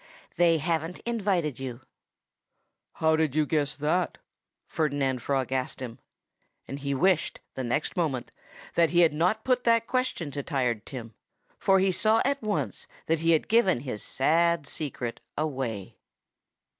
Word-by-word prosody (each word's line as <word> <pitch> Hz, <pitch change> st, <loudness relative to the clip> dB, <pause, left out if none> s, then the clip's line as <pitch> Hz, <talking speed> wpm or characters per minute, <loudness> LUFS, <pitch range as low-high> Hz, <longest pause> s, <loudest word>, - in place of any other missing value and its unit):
"They 170 Hz, -2 st, +4 dB
haven't 165 Hz, +2 st, -1 dB
invited 195 Hz, -, -1 dB
you." 130 Hz, -2 st, -6 dB, 1.1 s
"How 160 Hz, 0 st, +2 dB
did 155 Hz, -3 st, 0 dB
you 155 Hz, -1 st, +3 dB
guess 145 Hz, -1 st, 0 dB
that?" 155 Hz, +5 st, 0 dB, 0.5 s
Ferdinand 140 Hz, -5 st, 0 dB
Frog 135 Hz, -2 st, -1 dB
asked 130 Hz, -1 st, -2 dB
him. 125 Hz, -3 st, -7 dB, 0.7 s
He 140 Hz, 0 st, -3 dB
wished, 175 Hz, +2 st, +2 dB
the 130 Hz, -, -4 dB
next 125 Hz, +5 st, -1 dB
moment, 150 Hz, -8 st, -1 dB, 0.4 s
that 170 Hz, -1 st, +4 dB
he 175 Hz, 0 st, +4 dB
had 165 Hz, -3 st, +5 dB
not 180 Hz, +8 st, +1 dB
put 250 Hz, -1 st, +1 dB
that 230 Hz, -1 st, +4 dB
question 255 Hz, -, -1 dB
to 140 Hz, -, -3 dB
Tired 125 Hz, -7 st, -1 dB
Tim. 115 Hz, -4 st, -7 dB, 0.5 s
For 195 Hz, -, +4 dB
he 190 Hz, 0 st, +3 dB
saw 220 Hz, +4 st, +3 dB
at 280 Hz, +1 st, 0 dB
once 215 Hz, -2 st, -2 dB, 0.2 s
that 165 Hz, 0 st, +1 dB
he 165 Hz, +1 st, +1 dB
had 160 Hz, -, +1 dB
given 205 Hz, -, +3 dB
his 125 Hz, -7 st, -5 dB
sad 165 Hz, +3 st, +2 dB
secret 130 Hz, -6 st, -4 dB, 0.2 s
away. 130 Hz, -10 st, -3 dB
155 Hz, 145 wpm, -27 LUFS, 135-180 Hz, 1.1 s, had